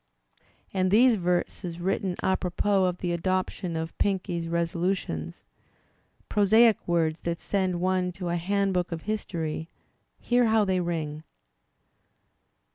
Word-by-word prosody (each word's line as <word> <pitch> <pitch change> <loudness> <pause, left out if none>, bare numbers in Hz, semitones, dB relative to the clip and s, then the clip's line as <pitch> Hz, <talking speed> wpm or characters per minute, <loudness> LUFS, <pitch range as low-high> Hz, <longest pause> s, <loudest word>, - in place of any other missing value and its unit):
And 185 -1 +1
these 235 +4 +6
verses 175 -1 -2
written 190 0 -1
"apropos 190 +1 +1
of 180 -1 -1
the 175 -1 -2
adoption 185 0 -1
of 160 0 -4
Pinckney's 180 -4 -1
resolutions'* 170 - -2 0.8
(prosaic 220 +2 +4
words 165 -2 +1
that 170 0 -3
send 185 -3 -1
one 185 0 +1
to 180 -1 -5
a 170 - 0
handbook 185 0 0
ol 170 - -2
history), 165 -5 -4 0.5
hear 245 0 +2
how 220 -1 +3
they 190 -1 +1
ring 160 -3 -3
180 Hz, 120 wpm, -27 LUFS, 170-195 Hz, 0.8 s, these